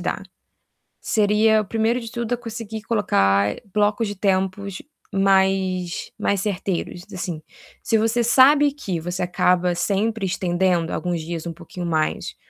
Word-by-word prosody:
dar. -, -, -3 dB, 0.8 s
Seria, 215 Hz, +1 st, +3 dB
o -, -, -6 dB
primeiro 225 Hz, +4 st, 0 dB
de 230 Hz, -2 st, -8 dB
tudo, 235 Hz, -1 st, -3 dB
a 245 Hz, -, 0 dB
conseguir 225 Hz, -2 st, -7 dB
colocar 100 Hz, -, +2 dB, 0.2 s
blocos 210 Hz, +2 st, +1 dB
de 205 Hz, -, -5 dB
tempos 190 Hz, 0 st, -1 dB, 0.3 s
mais 190 Hz, -2 st, +1 dB
mais 200 Hz, -, +1 dB
certeiros 185 Hz, -3 st, -3 dB
assim. 175 Hz, -4 st, -4 dB, 0.4 s
Se 230 Hz, -1 st, +1 dB
você 225 Hz, +2 st, +1 dB
sabe 280 Hz, +5 st, +5 dB
que 195 Hz, -, -4 dB
você 175 Hz, +3 st, -3 dB
acaba 180 Hz, 0 st, +2 dB
sempre 205 Hz, +4 st, 0 dB
estendendo 180 Hz, -2 st, 0 dB
alguns 175 Hz, -2 st, -2 dB
dias 165 Hz, 0 st, -5 dB
um 170 Hz, -, -4 dB
pouquinho 175 Hz, +2 st, -8 dB
mais, 155 Hz, -2 st, -1 dB
195 Hz, 140 wpm, -22 LUFS, 180-220 Hz, 0.8 s, sabe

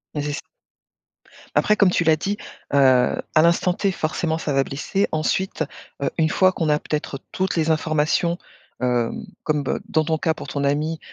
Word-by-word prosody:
Mais 150 Hz, -, -1 dB
c'est 145 Hz, 0 st, -2 dB
ça. 145 Hz, -, -3 dB, 1.2 s
Après, 210 Hz, -, +3 dB
comme 200 Hz, -3 st, +5 dB
tu 180 Hz, -, +1 dB
l'as 160 Hz, -1 st, +4 dB
dit, 200 Hz, +6 st, -2 dB, 0.4 s
heu, -, -, +4 dB
à 130 Hz, +3 st, +3 dB
l'instant 170 Hz, +2 st, +3 dB
T, 195 Hz, +1 st, 0 dB
forcément, 160 Hz, -1 st, -1 dB
ça 155 Hz, -, -3 dB
va 135 Hz, 0 st, +3 dB
blesser. 195 Hz, +8 st, -1 dB
Ensuite, 160 Hz, +3 st, 0 dB, 0.4 s
heu, 135 Hz, -, +1 dB
une 160 Hz, -1 st, +3 dB
fois 185 Hz, +3 st, +4 dB
qu'on 165 Hz, -3 st, -2 dB
a 150 Hz, -, +4 dB
peut-être 150 Hz, -2 st, -3 dB
toutes 190 Hz, 0 st, -1 dB
les 160 Hz, -1 st, +1 dB
informations, 160 Hz, +2 st, +1 dB, 0.5 s
heu, 120 Hz, -2 st, +2 dB, 0.3 s
comme 150 Hz, -2 st, 0 dB, 0.2 s
dans 155 Hz, -, +2 dB
ton 160 Hz, 0 st, 0 dB
cas 160 Hz, +1 st, +1 dB
pour -, -, -9 dB
ton 140 Hz, -1 st, -1 dB
ami, 155 Hz, +3 st, 0 dB
155 Hz, 185 wpm, -22 LUFS, 150-170 Hz, 1.2 s, comme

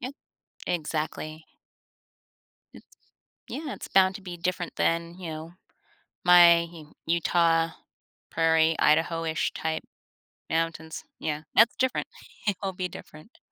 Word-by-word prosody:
Yeah. 250 Hz, -, -4 dB, 0.6 s
Exactly. 155 Hz, -1 st, -3 dB, 1.3 s
M -, -, -13 dB, 0.7 s
Yeah, 295 Hz, -2 st, -5 dB
it's -, -, -9 dB
bound 190 Hz, 0 st, +4 dB
to 200 Hz, -, -8 dB
be 180 Hz, -2 st, -7 dB
different 180 Hz, 0 st, -3 dB
than, 170 Hz, +1 st, 0 dB
you 175 Hz, -3 st, -6 dB
know, 160 Hz, +1 st, -7 dB, 0.7 s
my 175 Hz, -1 st, +8 dB
U 165 Hz, -3 st, -12 dB
Utah, 165 Hz, 0 st, +2 dB, 0.6 s
Prairie, 160 Hz, 0 st, +3 dB
Idaho-ish 160 Hz, +1 st, +1 dB
type 160 Hz, 0 st, -3 dB, 0.7 s
mountains. 160 Hz, -1 st, -2 dB
Yeah, 150 Hz, 0 st, -3 dB
that's 230 Hz, +1 st, +6 dB
different. 260 Hz, 0 st, 0 dB, 0.4 s
It'll 195 Hz, -1 st, -1 dB
be 180 Hz, 0 st, -3 dB
different. 155 Hz, +5 st, -13 dB
165 Hz, 110 wpm, -27 LUFS, 160-180 Hz, 1.3 s, my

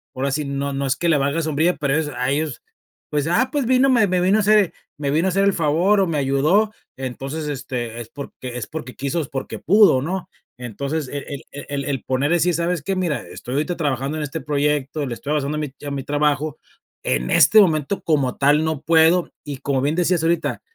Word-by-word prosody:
ahora 135 Hz, +1 st, -1 dB
sí, 150 Hz, +2 st, -1 dB
no 140 Hz, 0 st, -3 dB
no 140 Hz, 0 st, -2 dB
es 130 Hz, -, +1 dB
que 170 Hz, -, 0 dB
le 155 Hz, -, +4 dB
valga 140 Hz, +4 st, 0 dB
sombrilla, 160 Hz, +3 st, +1 dB
pero 140 Hz, -2 st, 0 dB
es, 160 Hz, -1 st, 0 dB
a 125 Hz, +1 st, -1 dB
ellos, 150 Hz, -2 st, -2 dB, 0.5 s
pues, 145 Hz, -1 st, 0 dB
ah, 205 Hz, +10 st, +2 dB
pues 285 Hz, -4 st, 0 dB
vino, 260 Hz, +2 st, +4 dB
me 240 Hz, -5 st, +4 dB
me 180 Hz, -1 st, +1 dB
vino 190 Hz, +4 st, +3 dB
a -, -, +2 dB
hacer 210 Hz, -3 st, +4 dB, 0.3 s
me 140 Hz, -2 st, -1 dB
vino 160 Hz, +5 st, +2 dB
a -, -, +3 dB
hacer 195 Hz, +2 st, +1 dB
el 200 Hz, -, +3 dB
favor 170 Hz, +6 st, +2 dB
o -, -, +3 dB
me 165 Hz, -3 st, -1 dB
ayudó, 150 Hz, +11 st, +2 dB, 0.3 s
entonces, 135 Hz, +4 st, -5 dB
este, 125 Hz, -5 st, -4 dB
es 115 Hz, -, -10 dB
porque 130 Hz, -3 st, -8 dB
es 120 Hz, -, -5 dB
porque 155 Hz, -5 st, -7 dB
quiso, 140 Hz, +4 st, -2 dB
es 145 Hz, -, -5 dB
porque 135 Hz, -1 st, -5 dB
pudo, 195 Hz, -8 st, +5 dB
¿no? 185 Hz, +2 st, -4 dB, 0.3 s
Entonces, 140 Hz, +5 st, -3 dB
e 145 Hz, -, -4 dB
el 140 Hz, -2 st, -6 dB
e 145 Hz, -, -8 dB
el 140 Hz, -1 st, -3 dB
el 140 Hz, -2 st, -2 dB
poner 135 Hz, +5 st, 0 dB
así, 175 Hz, +1 st, +2 dB
¿sabes 170 Hz, 0 st, -1 dB
qué? 195 Hz, +6 st, -2 dB
Mira, 170 Hz, -9 st, -1 dB
estoy 125 Hz, -, -8 dB
ahorita 155 Hz, +5 st, -1 dB
trabajando 140 Hz, -1 st, -1 dB
en 155 Hz, -, -2 dB
este 150 Hz, +2 st, -5 dB
proyecto, 145 Hz, 0 st, -1 dB
le 125 Hz, -, -4 dB
estoy 140 Hz, +5 st, -6 dB
avanzando 150 Hz, 0 st, -1 dB
a -, -, -2 dB
mi 150 Hz, -3 st, -4 dB
a 145 Hz, -, -4 dB
mi 140 Hz, -1 st, -3 dB
trabajo, 145 Hz, +1 st, 0 dB, 0.5 s
en 65 Hz, 0 st, -1 dB
este 220 Hz, -, +7 dB
momento 160 Hz, 0 st, +1 dB
como 140 Hz, -6 st, +1 dB
tal 145 Hz, +3 st, +3 dB
no 160 Hz, -3 st, -2 dB
puedo 165 Hz, +2 st, +4 dB
y, 145 Hz, -3 st, -6 dB
como 135 Hz, -2 st, 0 dB
bien 145 Hz, +4 st, 0 dB
decías 175 Hz, -1 st, +2 dB
ahorita, 165 Hz, 0 st, 0 dB
150 Hz, 230 wpm, -21 LUFS, 140-170 Hz, 0.5 s, este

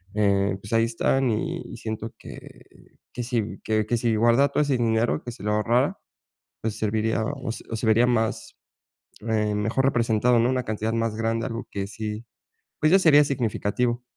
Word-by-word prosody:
eh, 100 Hz, -2 st, +2 dB
pues 100 Hz, -, -10 dB
ahí 115 Hz, 0 st, +4 dB
están 125 Hz, +3 st, +1 dB
y 105 Hz, -, -2 dB
y -, -, -8 dB
siento 110 Hz, 0 st, -5 dB
que -, -, -12 dB, 0.5 s
que 120 Hz, -, -4 dB
si 115 Hz, -3 st, -2 dB
que 110 Hz, -1 st, 0 dB
que 120 Hz, -, +1 dB
si 115 Hz, -1 st, +1 dB
guardara 120 Hz, +5 st, +4 dB
todo -, -, +1 dB
ese 140 Hz, -3 st, +1 dB
dinero, 115 Hz, 0 st, +1 dB
que 120 Hz, -, -6 dB
si 105 Hz, -, -13 dB
lo 105 Hz, -, 0 dB
ahorrara, 115 Hz, +4 st, +1 dB, 0.7 s
pues, 110 Hz, -1 st, -3 dB
serviría 110 Hz, +1 st, 0 dB
o 135 Hz, -1 st, -5 dB
o 115 Hz, 0 st, -5 dB
se 110 Hz, -, -3 dB
vería 115 Hz, +3 st, +4 dB
más, 115 Hz, -2 st, -1 dB, 0.7 s
eh, 105 Hz, -1 st, +1 dB
mejor 110 Hz, +6 st, 0 dB
representado, 120 Hz, -1 st, +2 dB
¿no? 120 Hz, +2 st, +2 dB
Una 130 Hz, -1 st, -1 dB
cantidad 110 Hz, +1 st, -2 dB
más 115 Hz, -1 st, -1 dB
grande, 115 Hz, 0 st, -1 dB
algo 115 Hz, 0 st, -5 dB
que 100 Hz, -1 st, -3 dB
sí, 110 Hz, +2 st, -6 dB, 0.5 s
pues, 155 Hz, +2 st, +3 dB
ya 190 Hz, -, +8 dB
sería 150 Hz, -4 st, +6 dB
significativo. 120 Hz, -2 st, -1 dB
115 Hz, 180 wpm, -25 LUFS, 110-120 Hz, 0.7 s, ya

